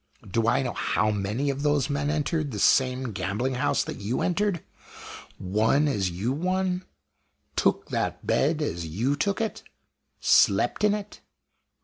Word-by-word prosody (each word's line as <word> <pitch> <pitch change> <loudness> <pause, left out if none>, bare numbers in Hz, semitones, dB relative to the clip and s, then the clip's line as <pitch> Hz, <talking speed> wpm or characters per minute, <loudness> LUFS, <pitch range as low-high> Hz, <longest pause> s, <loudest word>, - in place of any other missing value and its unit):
Do 115 +4 0
I 125 - +3
know 130 - -3
how 110 - 0
many 105 +8 -1
of 140 +1 -5
those 145 -2 +2
men 145 0 -1
entered 155 0 -1
the 110 - -5
same 130 +3 +2
gambling 100 +7 -2
house 125 - +1
that - - -7
you 105 +5 -2
entered? 190 -1 0 0.8
won 110 +10 +2
as 100 -9 0
you 95 +8 -2
won? 185 +3 -1 0.7
took - - +1
that - - -2
bed 155 +2 +1
as 85 - -3
you 115 - 0
took 200 +8 -1
it? 225 -1 -2 0.6
slept - - +3
in 210 0 +4
it? 210 -1 -8
135 Hz, 150 wpm, -26 LUFS, 110-160 Hz, 0.8 s, in